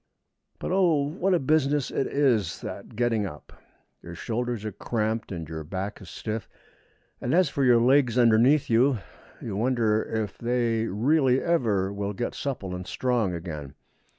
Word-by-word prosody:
But, -, -, -4 dB
oh, 175 Hz, -6 st, +3 dB
what 185 Hz, +4 st, +1 dB
a -, -, +2 dB
business 145 Hz, -1 st, +1 dB
it 135 Hz, -, 0 dB
is, 120 Hz, -, +1 dB
that -, -, -8 dB
getting 115 Hz, -3 st, +1 dB
up! 75 Hz, -5 st, -11 dB, 0.5 s
Your 85 Hz, 0 st, -9 dB
shoulders 120 Hz, +2 st, -3 dB
are 110 Hz, -, -3 dB
cramped 110 Hz, +2 st, -2 dB
and 85 Hz, -4 st, -5 dB
your 80 Hz, 0 st, -6 dB
back 95 Hz, +7 st, -5 dB
is 95 Hz, -, -11 dB
stiff; 110 Hz, -1 st, -5 dB, 0.7 s
and 125 Hz, -, 0 dB
as 180 Hz, -4 st, +4 dB
for 140 Hz, -, -1 dB
your 120 Hz, -2 st, +6 dB
legs 125 Hz, 0 st, +3 dB
underneath 120 Hz, +5 st, +5 dB
you, 125 Hz, +3 st, +3 dB, 0.5 s
you 105 Hz, -, -4 dB
wonder 110 Hz, -1 st, +2 dB
if 110 Hz, -3 st, -4 dB
they 115 Hz, -2 st, 0 dB
will 95 Hz, -, -5 dB
really 135 Hz, +1 st, +3 dB
ever 110 Hz, -, +1 dB, 0.2 s
get 120 Hz, +4 st, -3 dB
supple 110 Hz, -10 st, -4 dB
and 90 Hz, 0 st, -6 dB
strong 120 Hz, -8 st, 0 dB
again. 75 Hz, -5 st, -7 dB
115 Hz, 160 wpm, -26 LUFS, 100-135 Hz, 0.7 s, your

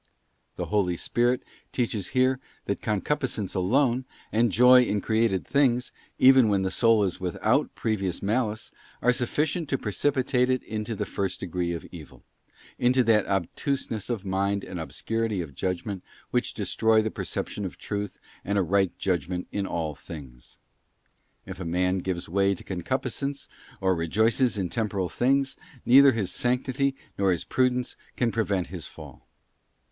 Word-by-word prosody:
'* -, -, -46 dB
The -, -, -3 dB
Holy 95 Hz, -4 st, +1 dB
Spirit 120 Hz, +6 st, +1 dB, 0.3 s
teaches 110 Hz, -6 st, -1 dB
here 130 Hz, 0 st, +2 dB, 0.3 s
that 100 Hz, -, -2 dB
concupiscence 110 Hz, -1 st, -1 dB
alone, 125 Hz, +7 st, +2 dB, 0.3 s
and 115 Hz, 0 st, +3 dB
joy 125 Hz, +4 st, +7 dB
in 105 Hz, -4 st, +1 dB
created 110 Hz, -3 st, +1 dB
things, 125 Hz, -3 st, +2 dB, 0.3 s
even 130 Hz, -3 st, +7 dB
when 100 Hz, -2 st, +2 dB
the 95 Hz, -, -1 dB
soul 115 Hz, -3 st, +4 dB
is 95 Hz, -2 st, -2 dB
without 90 Hz, -2 st, 0 dB
previous 100 Hz, -5 st, -1 dB
malice, 110 Hz, +1 st, -1 dB, 0.3 s
are 125 Hz, -, +5 dB
sufficient 145 Hz, +6 st, 0 dB
to 135 Hz, -, +1 dB
precipitate 125 Hz, -, +1 dB
it 130 Hz, -1 st, +1 dB
into 110 Hz, +1 st, -4 dB
the -, -, -2 dB
first 95 Hz, -2 st, -3 dB
degree 90 Hz, -1 st, -2 dB
of 85 Hz, -, -5 dB
evil; 80 Hz, -5 st, -12 dB, 0.6 s
into 125 Hz, +1 st, +4 dB
that 110 Hz, -3 st, +3 dB
obtuseness 105 Hz, -, -2 dB
of 110 Hz, -5 st, -3 dB
mind 100 Hz, +1 st, 0 dB
and 90 Hz, -, -6 dB
obscurity 115 Hz, +5 st, -2 dB
of 80 Hz, -5 st, -5 dB
judgment 95 Hz, +4 st, -3 dB, 0.3 s
which -, -, 0 dB
destroy 110 Hz, -1 st, +2 dB
the 110 Hz, -, -2 dB
perception 105 Hz, -, -4 dB
of 95 Hz, -, -5 dB
truth 105 Hz, -1 st, -4 dB, 0.3 s
and 100 Hz, +2 st, -1 dB
a 100 Hz, -, +3 dB
right 95 Hz, 0 st, +1 dB
judgment 90 Hz, -1 st, -1 dB
in 100 Hz, -1 st, -2 dB
all 80 Hz, -4 st, -2 dB
things. 70 Hz, -4 st, -11 dB, 0.9 s
If 95 Hz, 0 st, -8 dB
a -, -, -4 dB
man 90 Hz, +2 st, +1 dB
gives 90 Hz, -1 st, -3 dB
way 100 Hz, +3 st, +2 dB
to -, -, -13 dB
concupiscence, 130 Hz, -, -3 dB, 0.3 s
or 95 Hz, -1 st, +2 dB
rejoices 110 Hz, +8 st, +2 dB
in 95 Hz, -3 st, -1 dB
temporal 100 Hz, -2 st, -1 dB
things, 135 Hz, -, +1 dB, 0.3 s
neither 135 Hz, +2 st, +8 dB
his 105 Hz, -6 st, -2 dB
sanctity 130 Hz, +2 st, 0 dB, 0.2 s
nor 100 Hz, -1 st, +3 dB
his 85 Hz, -, 0 dB
prudence 125 Hz, -1 st, 0 dB, 0.2 s
can 120 Hz, -2 st, +1 dB
prevent 100 Hz, -5 st, 0 dB
his 90 Hz, -5 st, -6 dB
fall. -, -, -13 dB
105 Hz, 155 wpm, -26 LUFS, 95-125 Hz, 0.9 s, neither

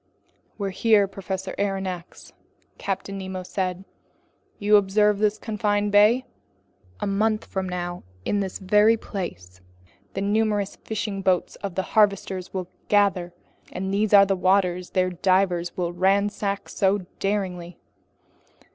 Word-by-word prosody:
"Here 195 Hz, -2 st, -3 dB
we 225 Hz, -1 st, +6 dB
are, -, -, -1 dB
Professor 190 Hz, -1 st, -5 dB
Aronnax," 190 Hz, -3 st, -4 dB, 0.5 s
Captain 195 Hz, 0 st, -3 dB
Nemo 190 Hz, -1 st, -5 dB
then -, -, -11 dB
said. 185 Hz, 0 st, -3 dB, 0.7 s
"You 210 Hz, +1 st, +4 dB
observe 205 Hz, +1 st, +2 dB
this 210 Hz, 0 st, +2 dB
confined 205 Hz, -1 st, -1 dB
bay? 215 Hz, +5 st, +5 dB, 0.8 s
A -, -, 0 dB
month 215 Hz, +2 st, 0 dB
from 190 Hz, -1 st, -3 dB
now 175 Hz, 0 st, -4 dB, 0.2 s
in 205 Hz, -, +1 dB
this 190 Hz, -2 st, -3 dB
very 210 Hz, +3 st, +4 dB
place, 90 Hz, -, -7 dB, 0.5 s
the 195 Hz, -, -2 dB
numerous 205 Hz, -1 st, 0 dB
fishing 210 Hz, -2 st, -4 dB
boats 185 Hz, -2 st, +1 dB
of 195 Hz, -3 st, -6 dB
the 190 Hz, -, 0 dB
harvesters 200 Hz, -3 st, +2 dB
will 185 Hz, -2 st, -4 dB, 0.2 s
gather, 195 Hz, -4 st, +2 dB, 0.4 s
and 190 Hz, +1 st, -3 dB
these 210 Hz, +1 st, +1 dB
are 200 Hz, -1 st, +8 dB
the 195 Hz, 0 st, +1 dB
waters 180 Hz, -1 st, +1 dB
their 185 Hz, -1 st, +1 dB
divers 180 Hz, -1 st, +1 dB
will 175 Hz, -1 st, -1 dB
ransack 200 Hz, +2 st, 0 dB
so 195 Hz, -1 st, +1 dB
daringly. 185 Hz, -4 st, -2 dB
195 Hz, 135 wpm, -24 LUFS, 185-205 Hz, 0.8 s, are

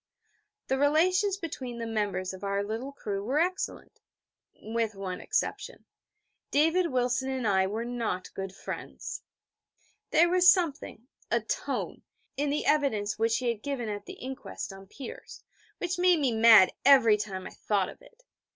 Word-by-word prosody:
The 265 Hz, -, -1 dB
relations 365 Hz, +7 st, +3 dB
between 260 Hz, -9 st, -6 dB
the 230 Hz, -, -4 dB
members 200 Hz, -4 st, -2 dB
of 190 Hz, -, -10 dB
our 200 Hz, 0 st, 0 dB
little 225 Hz, +6 st, -4 dB
crew 205 Hz, -7 st, -4 dB
were 260 Hz, +7 st, -1 dB
excellent 365 Hz, +4 st, -2 dB, 0.6 s
with 225 Hz, -1 st, -2 dB
one 190 Hz, -2 st, -5 dB
exception: -, -, -3 dB, 0.6 s
David 325 Hz, +5 st, +3 dB
Wilson 250 Hz, +1 st, 0 dB
and 260 Hz, -3 st, -1 dB
I 190 Hz, -2 st, +3 dB
were 220 Hz, +4 st, -3 dB
not 230 Hz, -7 st, -3 dB
good 195 Hz, -1 st, -5 dB
friends. -, -, -7 dB, 0.9 s
There 340 Hz, +2 st, +5 dB
was 360 Hz, +1 st, +3 dB
a -, -, +8 dB
something 310 Hz, -, +2 dB, 0.2 s
a -, -, +2 dB
tone -, -, -3 dB, 0.3 s
in 285 Hz, +1 st, -1 dB
the 295 Hz, +1 st, -1 dB
evidence 265 Hz, -9 st, +1 dB
which 225 Hz, 0 st, +2 dB
he 250 Hz, -2 st, -1 dB
had 230 Hz, -3 st, -3 dB
given 260 Hz, -5 st, -3 dB
at 205 Hz, -1 st, -6 dB
the 380 Hz, -, -7 dB
inquest 260 Hz, -, -7 dB
on 195 Hz, 0 st, -12 dB
Peters, 370 Hz, -, -10 dB, 0.3 s
which 355 Hz, 0 st, -3 dB
made 360 Hz, -2 st, +4 dB
me 270 Hz, -4 st, +2 dB
mad 220 Hz, -4 st, +7 dB
every 260 Hz, -6 st, +7 dB
time 195 Hz, -3 st, -5 dB
I -, -, -7 dB
thought 200 Hz, -3 st, 0 dB
of -, -, -13 dB
it. -, -, -20 dB
245 Hz, 160 wpm, -28 LUFS, 210-305 Hz, 0.9 s, a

